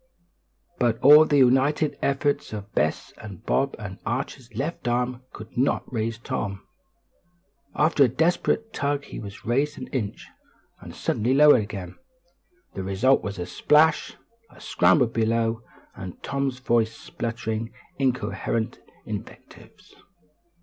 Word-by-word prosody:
But 120 -2 +2
all 150 +3 +9
the 145 - +2
united 135 +4 +3
efforts 140 -3 0
of 105 -1 -7
Bess - - -1
and 105 0 -10
Bob 135 +1 +1
and 100 -2 -8
Archie's 125 +1 -4
left 140 +2 -3
arm 125 +1 -1
could 110 +1 -11
not 130 +3 +1
raise 115 0 -2
Tom. 100 -4 -4 1.1
After 150 -2 +4
a - - +1
desperate 175 - 0
tug 145 0 -1
he - - -8
was 100 -1 -10
raised 140 +5 0
an 130 - -6
inch, 115 -7 -4 0.5
and - - -11
suddenly 120 +5 0
lowered 145 -4 +7
again. 95 -4 -7 0.8
The 95 - -5
result 100 +8 +2
was 100 -1 -5
a 90 - -4
splash, 155 - +3 0.4
a - - -18
scramble 155 - +3
below, 115 0 0 0.3
and 95 -3 -9
Tom's 140 -2 -2
voice 115 -3 0
sputtering 115 -1 -4 0.3
incoherent 125 -3 -1 0.3
invectives. - - -10
125 Hz, 130 wpm, -25 LUFS, 110-140 Hz, 1.1 s, all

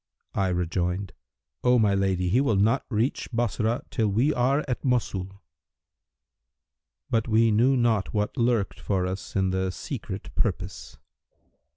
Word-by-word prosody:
I 95 - +1
rejoined, 90 +2 -1 0.5
'O 125 0 +5
my 105 -3 +3
lady 95 -2 +1
he 120 +8 +3
will 135 -7 +2
not 110 +7 +2
reach 115 +3 -1
Bassorah, 120 +1 0
till 110 -3 +1
we 120 +10 +2
are 135 +4 +1
at 125 - -3
Mosul.' 100 -6 -1 1.7
But 115 0 +1
we 115 0 +4
knew 125 +5 +4
not 115 -5 +1
what 105 -1 -1
lurked 120 -5 0
for 95 -3 -1
us 95 +1 -5
in 95 -1 +2
the 95 0 0
Secret 90 - -6
Purpose. - - -3
110 Hz, 140 wpm, -26 LUFS, 95-120 Hz, 1.7 s, O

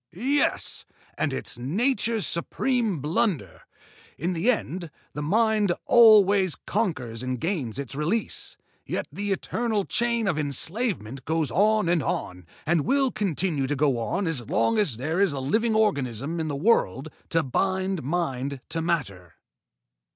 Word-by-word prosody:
"Yes! 270 - 0 0.3
And 145 - -1
it's 130 - -4
Nature's 220 - 0
supreme 215 - -1
blunder! 155 - -1 0.6
In 175 +4 -1
the 175 +8 +1
end, 180 - -1 0.2
the 150 - -4
Mind 210 +4 +2
always 205 -6 +6
conquers 130 - -2
and 130 -1 -3
gains 150 - -2
its 140 -2 -5
release, 160 +11 -2 0.3
yet - - -3
the 205 0 -3
eternal 215 +1 -1
chain 235 -1 +1
of 165 -5 0
enslavement 145 - -1
goes 160 0 0
on 215 0 +3
and 170 -1 +2
on, 90 -7 -4 0.2
and 165 -1 +2
will 270 - +2
continue 170 -7 -1
to 145 - -1
go 135 -3 +1
on 150 - -1
as 140 -9 -3
long 115 - +2
as 155 - +1
there 160 +9 -1
is 200 -7 +3
a 140 - -3
living 220 - +1
organism 145 - 0
in 160 - -2
the 145 - -2
world 145 - +1 0.2
to 165 0 +2
bind 190 +5 -1
mind 140 -3 -2
to 165 - -2
matter." 100 - -3
170 Hz, 145 wpm, -25 LUFS, 140-210 Hz, 0.6 s, always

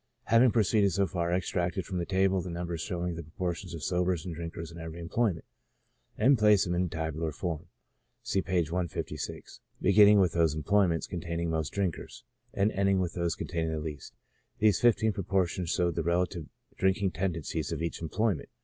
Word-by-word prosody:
Having 115 +3 +5
proceeded 105 -3 +3
so 100 +3 +2
far, 85 -3 -2
I 90 - +3
extracted 90 0 -2
from 90 0 -3
the 85 - -3
table 95 -1 +2
the 90 - -6
numbers 85 -1 -4
showing 90 -2 -3
the 85 - -5
proportions 85 +2 -4
of 80 - -7
sobers 90 0 0
and 90 - -4
drinkers 85 0 -6
in 85 - -10
every 80 +1 -7
employment, 85 0 -1 0.7
and 130 +3 +4
placed 105 -2 +5
them 90 - -1
in 90 +1 +1
a - - -2
tabular 80 -1 -3
form, 85 +2 -4 0.6
(see 95 - 0
p. - - -9
156,) 85 +2 -4 0.2
beginning 105 +1 +6
with 90 -4 +3
those 80 -3 +2
employments 85 +1 +2
containing 85 -1 -3
most 80 -3 -1
drinkers, 95 -5 -3 0.3
and 100 +2 +1
ending 100 -1 +2
with 90 -2 -1
those 85 -2 -1
containing 85 -2 -2
the 80 - -2
least; 75 -2 -7 0.4
these 105 -3 +3
fifteen 110 -2 +3
proportions 95 -3 -1
showed 85 -1 +1
the 85 - -1
relative 85 -1 -1 0.3
drinking 95 0 +1
tendencies 85 -4 -2
of - - -3
each 85 - -3
employment. 95 +2 -1
90 Hz, 180 wpm, -29 LUFS, 85-95 Hz, 0.7 s, beginning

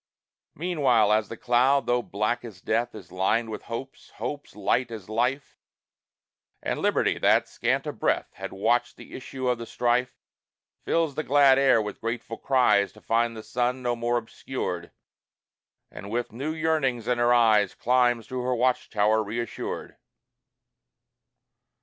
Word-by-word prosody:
Meanwhile 125 - +3
the 115 - -8
cloud, 130 +4 +3
though 120 0 +2
black 105 +2 -2
as 110 -6 -10
death, 120 +5 -1
Is 95 -5 -11
lined 110 +5 0
with 105 - -5
hopes, 125 +4 -7
hopes 145 -1 -6
light 125 -1 0
as 110 -4 -9
life, 125 +5 -1 1.0
And - - -2
Liberty - - +1
that, - - +3
scant - - -1
of - - -6
breath, - - 0
Had - - -7
watched 120 +5 0
the - - -13
issue 130 0 -5
of 125 -1 +1
the 115 - -7
strife, 125 +1 0 0.7
Fills 165 -3 +1
the 155 - -2
glad 140 -2 +5
air 135 -4 +5
with 105 -1 -5
grateful 115 0 -4
cries 105 -7 +3
To 110 - -16
find 115 0 0
the 110 - -8
sun 125 +2 -1
no 120 -1 0
more 120 +1 0
obscured, 110 -6 -5 1.0
And 100 - -9
with 120 +2 -2
new 135 +8 -4
yearnings 155 -7 0
in 125 -1 +1
her 120 0 +3
eyes 110 -5 +4
Climbs 120 -2 +2
to 130 -1 -3
her 125 0 0
watch 125 +1 +1
tower 110 +1 +2
reassured. 115 +2 -5
120 Hz, 150 wpm, -26 LUFS, 110-130 Hz, 1.0 s, glad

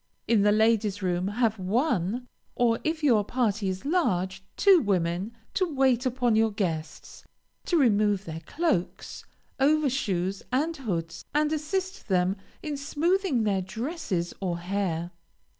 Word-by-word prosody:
In 225 -3 +4
the 205 +1 +4
ladies' 215 -2 +2
room, 180 0 0
have 220 0 0
one, 225 - 0 0.3
or 230 -1 +2
if 315 0 -2
your 230 -8 +4
party 215 -3 0
is 185 +4 -5
large, 190 - 0
two 385 -4 +6
women 185 -1 0 0.2
to 370 -4 0
wait 265 -2 +2
upon 245 -2 +1
your 220 0 +4
guests; 170 -7 -4 0.4
to 345 - +2
remove 210 - +3
their 160 0 -6
cloaks, 185 - -2 0.3
overshoes, 260 - +1
and 305 +6 0
hoods, 170 - -4
and 300 +1 +2
assist 375 +5 -3
them 185 0 +2 0.3
in 300 -2 -3
smoothing 305 - 0
their 200 -3 +1
dresses 210 - -3
or 180 -3 -1
hair. 175 -2 -2
220 Hz, 135 wpm, -27 LUFS, 190-285 Hz, 0.4 s, two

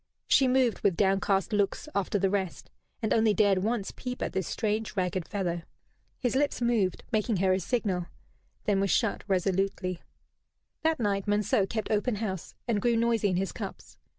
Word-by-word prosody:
She 265 - +4
moved, 250 -5 +2
with 185 -4 +1
downcast 195 +1 +2
looks, 205 +7 0
after 200 +1 0
the 195 -1 +1
rest, 190 -3 -3 0.3
and 215 - +2
only 220 -2 +3
dared 200 -3 +4
once 215 +1 -1
peep 250 0 -5
at - - -3
this 190 -2 -1
strange 215 -3 -2
ragged 180 -1 -1
fellow. 175 -4 -2 0.6
His 245 0 -1
lips 285 +1 +1
moved, 230 -7 +1
making 215 -1 +1
her 185 +1 +3
a 185 - +1
signal, 185 -4 -1 0.6
then 200 -2 +2
were 195 - +2
shut 220 +2 +1
resolutely. 190 -1 0 0.8
That 320 -1 +1
night 200 -3 0
Monceux 205 -1 +2
kept 220 -1 -3
open 215 +2 +1
house 195 -4 -4
and 215 -4 +1
grew 240 +1 +2
noisy 230 -2 +2
in 185 - 0
his 195 +1 -1
cups. - - -8
205 Hz, 175 wpm, -29 LUFS, 190-225 Hz, 0.8 s, She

